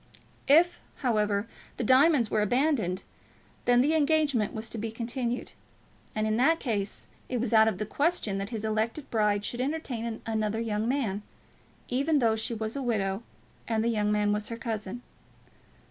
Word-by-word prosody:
If, 345 Hz, +5 st, +5 dB, 0.3 s
however, 210 Hz, -3 st, +1 dB, 0.3 s
the -, -, -2 dB
diamonds 260 Hz, 0 st, +4 dB
were 215 Hz, -, +2 dB
abandoned, 220 Hz, -, +1 dB, 0.6 s
then 245 Hz, 0 st, +5 dB
the 295 Hz, +5 st, +2 dB
engagement 295 Hz, -7 st, +2 dB
was 220 Hz, +1 st, -5 dB
to 230 Hz, -, -4 dB
be 225 Hz, +1 st, -3 dB
continued; 235 Hz, +2 st, -3 dB, 0.6 s
and 215 Hz, 0 st, 0 dB
in 215 Hz, 0 st, +1 dB
that 320 Hz, +7 st, +4 dB
case 205 Hz, -5 st, -3 dB, 0.2 s
it 250 Hz, -, -1 dB
was 235 Hz, -1 st, -1 dB
out 220 Hz, 0 st, +7 dB
of 220 Hz, -, 0 dB
the 215 Hz, -, -2 dB
question 280 Hz, -, 0 dB
that 195 Hz, +1 st, -4 dB
his 220 Hz, -2 st, -4 dB
elected 220 Hz, +6 st, -1 dB
bride 210 Hz, -2 st, +1 dB
should 245 Hz, -, -2 dB
entertain 250 Hz, -6 st, -3 dB
another 220 Hz, -1 st, -1 dB
young 220 Hz, -1 st, -1 dB
man, 230 Hz, -7 st, -1 dB, 0.7 s
even 280 Hz, +5 st, +1 dB
though 230 Hz, -5 st, +3 dB
she 220 Hz, +1 st, -2 dB
was 220 Hz, +1 st, -3 dB
a 280 Hz, -, -2 dB
widow 205 Hz, -5 st, -1 dB, 0.5 s
and 225 Hz, -1 st, +1 dB
the 235 Hz, -, +2 dB
young 210 Hz, -2 st, +1 dB
man 210 Hz, 0 st, +2 dB
was 210 Hz, 0 st, -2 dB
her 230 Hz, -, -5 dB
cousin. 225 Hz, -1 st, -4 dB
225 Hz, 170 wpm, -28 LUFS, 215-255 Hz, 0.7 s, out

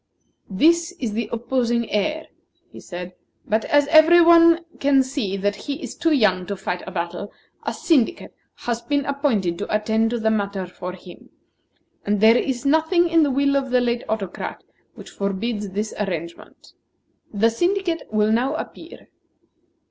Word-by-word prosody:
"This 335 Hz, -, +2 dB
is 250 Hz, -, -4 dB
the 230 Hz, +1 st, -3 dB
opposing 235 Hz, 0 st, -1 dB
heir," 305 Hz, +10 st, -1 dB, 0.5 s
he -, -, -11 dB
said; 180 Hz, 0 st, -8 dB, 0.3 s
"but 220 Hz, +1 st, 0 dB
as 290 Hz, 0 st, +3 dB
every 320 Hz, +3 st, +7 dB
one 335 Hz, 0 st, +6 dB
can 275 Hz, -1 st, +3 dB
see 255 Hz, -8 st, -3 dB
that 205 Hz, +1 st, -1 dB
he 280 Hz, +7 st, -5 dB
is -, -, -6 dB
too 330 Hz, -1 st, 0 dB
young 190 Hz, -, +2 dB
to 200 Hz, -, -3 dB
fight 180 Hz, -1 st, -4 dB
a -, -, -6 dB
battle, 175 Hz, +2 st, -5 dB, 0.4 s
a -, -, +1 dB
syndicate 320 Hz, 0 st, 0 dB, 0.2 s
has 235 Hz, -1 st, -4 dB
been 285 Hz, +1 st, -1 dB
appointed 235 Hz, -, -1 dB
to 205 Hz, -, -5 dB
attend 220 Hz, +1 st, +1 dB
to 240 Hz, 0 st, -2 dB
the 220 Hz, 0 st, +1 dB
matter 200 Hz, -3 st, -2 dB
for 180 Hz, 0 st, -8 dB
him; 180 Hz, -1 st, -14 dB, 0.7 s
and 205 Hz, 0 st, 0 dB
there 220 Hz, +2 st, +6 dB
is 255 Hz, +1 st, -1 dB
nothing 320 Hz, +4 st, +3 dB
in 330 Hz, 0 st, +4 dB
the 295 Hz, -, +3 dB
will 280 Hz, +1 st, +1 dB
of 270 Hz, -1 st, 0 dB
the 250 Hz, 0 st, +3 dB
late 240 Hz, 0 st, -1 dB
Autocrat 200 Hz, -4 st, -4 dB, 0.3 s
which -, -, -12 dB
forbids 205 Hz, +2 st, -3 dB
this 210 Hz, +3 st, -4 dB
arrangement. 170 Hz, -4 st, -6 dB, 0.6 s
The 225 Hz, +2 st, +2 dB
syndicate 350 Hz, -, -1 dB
will 215 Hz, 0 st, +2 dB
now 255 Hz, +6 st, +1 dB
appear." -, -, -9 dB
235 Hz, 165 wpm, -22 LUFS, 205-290 Hz, 0.7 s, every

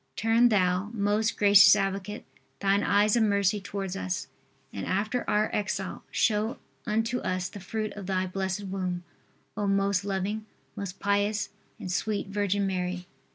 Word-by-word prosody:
Turn 225 Hz, +2 st, +4 dB
thou, 185 Hz, -1 st, +2 dB
most 210 Hz, +1 st, +1 dB
gracious 200 Hz, -1 st, +8 dB
advocate, 195 Hz, +1 st, -3 dB, 0.3 s
thine 200 Hz, 0 st, +2 dB
eyes 205 Hz, +2 st, +3 dB
of 235 Hz, -, +3 dB
mercy 200 Hz, -1 st, +2 dB
towards 195 Hz, -1 st, -4 dB
us, 95 Hz, -1 st, -3 dB, 0.5 s
and 100 Hz, -, -5 dB
after 215 Hz, +6 st, 0 dB
our 210 Hz, +1 st, +2 dB
exile 200 Hz, -2 st, -2 dB
show 215 Hz, +1 st, +1 dB, 0.3 s
unto 225 Hz, +3 st, 0 dB
us 185 Hz, -1 st, -2 dB
the 205 Hz, -, -9 dB
fruit 215 Hz, +3 st, -4 dB
of 200 Hz, -3 st, -8 dB
thy 185 Hz, -1 st, 0 dB
blessed 190 Hz, +1 st, -3 dB
womb, 185 Hz, -2 st, -3 dB, 0.5 s
O 205 Hz, -1 st, -1 dB
most 195 Hz, -1 st, +2 dB
loving, 200 Hz, +2 st, -2 dB, 0.3 s
most 200 Hz, -3 st, -6 dB
pious 205 Hz, +1 st, +1 dB, 0.3 s
and 185 Hz, -, -5 dB
sweet 205 Hz, +1 st, -1 dB
virgin 200 Hz, 0 st, 0 dB
Mary. 180 Hz, -1 st, -2 dB
200 Hz, 150 wpm, -28 LUFS, 190-210 Hz, 0.5 s, gracious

